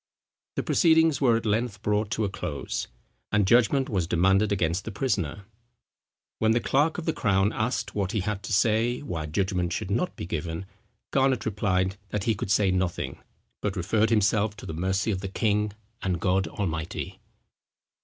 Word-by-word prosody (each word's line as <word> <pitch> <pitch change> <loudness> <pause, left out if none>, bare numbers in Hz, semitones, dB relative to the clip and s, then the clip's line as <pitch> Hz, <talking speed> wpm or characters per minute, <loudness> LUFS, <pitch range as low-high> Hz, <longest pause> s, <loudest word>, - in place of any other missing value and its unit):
The - - -1
proceedings 160 -4 +4
were 120 -4 +4
at 115 - -5
length 110 0 -1
brought 105 0 +1
to 110 -1 0
a - - -1
close; 75 -6 -4 0.4
and 105 -1 +3
judgment 125 +5 +4
was 95 -6 -1
demanded 95 +5 +3
against 90 -2 0
the 110 - -5
prisoner. 100 - -2 0.9
When 110 0 +3
the 120 - +3
clerk 145 +6 +1
of 175 - -4
the 160 - +1
crown 100 -2 +2
asked 115 +4 -1
what 100 -2 -1
he 110 -4 0
had 100 +1 -2
to 90 - -7
say 115 +4 +2
why 80 - -4
judgment 90 +1 0
should 105 -3 -3
not 120 - 0
be - - -5
given, 85 +2 -4 0.5
Garnet 135 -2 +2
replied 95 -2 0
that 105 -2 -2
"he 115 - +2
could 95 - -5
say 100 -2 +3
nothing, 90 -1 -2 0.4
but 105 -2 -1
referred 105 +5 +1
himself 105 -1 +2
to - - -9
the - - -5
mercy 95 +6 0
of 95 -2 -2
the 95 - -3
king 105 +1 0 0.3
and 90 -3 -1
God 95 +1 +1
Almighty." 85 -5 -4
105 Hz, 175 wpm, -27 LUFS, 95-110 Hz, 0.9 s, proceedings